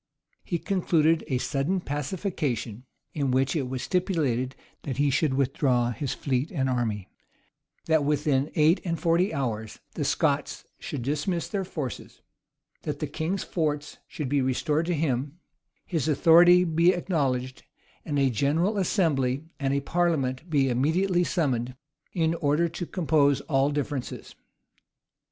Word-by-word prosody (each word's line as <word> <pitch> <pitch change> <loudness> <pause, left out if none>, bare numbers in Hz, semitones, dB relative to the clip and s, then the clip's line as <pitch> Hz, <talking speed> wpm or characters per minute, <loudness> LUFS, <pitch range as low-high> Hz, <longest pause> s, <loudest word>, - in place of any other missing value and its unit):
He 175 - -2
concluded 165 -4 +2
a 130 -5 0
sudden 140 +9 -1
pacification, 145 - -3 0.3
in 140 -3 -1
which 130 +2 +1
it 135 -5 -1
was 130 -1 -4
stipulated, 150 - 0 0.3
that 135 -2 -5
he 145 0 +2
should 135 0 +1
withdraw 130 -3 +1
his 135 +2 -3
fleet 135 +1 -1
and 135 -7 0
army; 110 -6 -1 0.8
that 160 -2 +3
within 145 -1 +1
eight 160 +4 +4
and 165 -3 -2
forty 175 +2 +2
hours 115 -7 -3 0.2
the - - -3
Scots - - 0
should 135 -5 -5
dismiss 150 +6 -1
their 200 -2 -2
forces; 150 -8 -6 0.6
that - - -4
the - - -2
king's 180 +5 -3
forts 150 -3 -2
should 150 - -5
be 140 +1 +1
restored 150 +5 0
to 175 - +1
him; 145 0 -1 0.5
his 160 -6 -1
authority 175 +4 +6
be 170 +1 +3
acknowledged; 135 -8 -1 0.4
and 145 -2 -2
a 135 -2 +3
general 160 - +1
assembly 150 - +1
and 135 -2 0
a 140 0 +1
parliament 160 -3 0
be 140 -4 +2
immediately 170 +9 +2
summoned, 130 -9 -1 0.4
in 165 -2 +1
order 155 +1 +1
to 170 +1 -6
compose 150 -5 +2
all 135 -2 +1
differences. 145 -2 -4
145 Hz, 140 wpm, -26 LUFS, 130-170 Hz, 0.8 s, authority